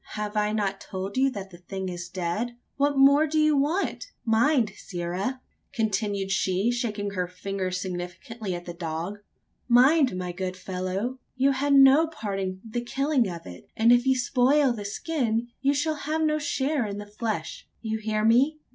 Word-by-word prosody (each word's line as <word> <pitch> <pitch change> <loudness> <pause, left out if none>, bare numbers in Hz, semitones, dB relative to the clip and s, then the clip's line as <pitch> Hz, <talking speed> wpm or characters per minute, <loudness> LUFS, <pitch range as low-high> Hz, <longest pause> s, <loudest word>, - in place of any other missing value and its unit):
Have 210 0 -4
I 210 0 +1
not 200 -2 -1
told 190 +1 -5
you 270 +1 +3
that 195 -6 -7
the 175 - -13
thing 190 +1 -5
is 175 -1 -6
dead 195 +7 -3 0.2
what 285 0 +1
more 280 +3 +6
do 310 +1 -1
you 305 -1 +4
want? 315 - 0 0.2
Mind, 230 0 +3
sirrah!" 185 +8 -4 0.3
continued 205 -3 -1
she, 195 +4 +1
shaking 210 -4 -2
her 180 -2 -2
finger 190 +1 -4
significantly 185 +4 -5
at 175 0 -7
the 175 - -6
dog 170 +4 -4 0.5
"mind, 255 - +5
my 180 -1 -3
good 185 +1 -4
fellow! 185 +7 -3 0.2
you 270 +2 +3
had 280 +1 +2
no 275 +4 +7
part 210 -11 -4
in 185 -1 -3
the 240 +2 -3
killing 270 -1 +1
of 170 -2 -7
it; 90 -1 -11
and 230 +2 +5
if 245 +1 +4
you 265 0 +4
spoil 255 +2 +3
the 210 -3 -6
skin, 235 0 -1
you 275 +1 +3
shall 310 +2 +1
have 310 +2 -2
no 305 0 +2
share 280 -3 0
in 200 0 -5
the 205 - -6
flesh. 215 +1 -4 0.2
You 220 0 -2
hear 215 0 -1
me? 260 +7 +4
220 Hz, 180 wpm, -26 LUFS, 190-270 Hz, 0.5 s, no